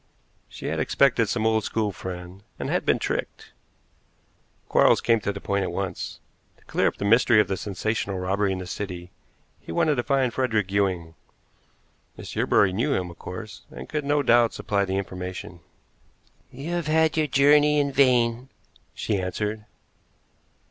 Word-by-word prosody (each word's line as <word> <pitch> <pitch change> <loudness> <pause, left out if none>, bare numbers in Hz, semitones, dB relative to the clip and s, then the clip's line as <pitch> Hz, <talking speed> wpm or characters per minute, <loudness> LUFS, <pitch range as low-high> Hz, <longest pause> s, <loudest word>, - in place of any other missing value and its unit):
She - - -10
had - - -2
expected 120 -6 +2
some 110 -1 -1
old 110 -1 +2
school 110 -1 -1
friend, 90 0 -8 0.2
and - - -4
had - - -1
been - - +4
tricked. - - -4 1.2
Quarles - - +4
came 115 -1 +2
to 100 - -1
the 100 - -7
point 100 0 -1
at 95 - -2
once. 95 -1 -4 0.4
To - - -26
clear - - +1
up - - -2
the - - -3
mystery 115 +1 +5
of 105 - +3
the 95 - -1
sensational 100 0 -3
robbery 95 +2 0
in 95 - -2
the 90 - -6
city, 90 -1 -6 0.5
he - - -10
wanted 150 - +2
to 120 - 0
find 135 -3 +1
Frederick 110 -7 0
Ewing. 95 -5 0 1.0
Miss - - -8
Yerbury 95 -2 +3
knew 130 +9 +1
him, 90 -1 -2
of 85 - -15
course, 100 +2 -8
and 65 +1 -9
could 150 - -3
no 145 +1 +1
doubt 120 -2 +4
supply 100 -1 -1
the 95 0 -2
information. 90 -2 -6 0.9
"You 140 +7 -6
have 175 -2 -2
had 160 0 +3
your 155 -1 +1
journey 145 +2 +4
in 140 -1 +1
vain," 125 -2 +2 0.5
she 105 -3 -1
answered. 105 +3 -3
105 Hz, 170 wpm, -25 LUFS, 95-130 Hz, 1.2 s, mystery